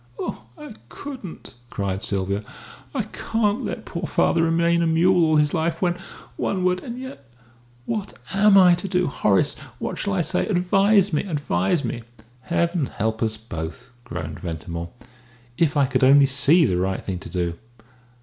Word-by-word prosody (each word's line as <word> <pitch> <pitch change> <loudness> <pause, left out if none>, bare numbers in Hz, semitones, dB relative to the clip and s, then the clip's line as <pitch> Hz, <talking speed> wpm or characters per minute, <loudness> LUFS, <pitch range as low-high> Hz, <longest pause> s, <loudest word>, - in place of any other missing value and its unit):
"Oh, 110 - -5
I 150 - -9 0.2
couldn't!" 255 - -9 0.2
cried 100 -3 -3
Sylvia. 100 0 -1 0.5
"I - - -1
can't 225 +2 -1
let 220 - -5
poor 170 -1 -4
father 165 - +2
remain 170 +1 +2
a 170 - +2
mule 175 +2 +4
all 155 -1 +3
his 150 -1 +3
life 165 +1 0
when 175 -2 +1 0.4
one 185 -2 -1
word 180 0 +2
and 240 0 -7
yet 255 - -9 0.6
what 210 +2 -3 0.2
am 195 0 +5
I 180 -2 +7
to 175 +3 -2
do? 180 -1 +1
Horace, 105 - +2 0.2
what - - -4
shall 200 - -1
I 190 - +1
say? 180 +3 0
Advise 195 0 +3
me.... 150 - +1
Advise 145 - 0
me!" 120 0 -4 0.4
"Heaven 170 +2 0
help 110 +1 -2
us 110 -1 0
both!" 110 +2 -7
groaned 80 -9 -6
Ventimore. 85 -1 -5 0.7
"If 155 -2 +2
I 140 - +5
could 130 - 0
only 140 +2 +7
see 145 +5 +4
the 90 - +1
right 95 +1 -2
thing 95 -2 -3
to 95 - -9
do. 85 -2 -1
160 Hz, 170 wpm, -23 LUFS, 110-180 Hz, 0.7 s, I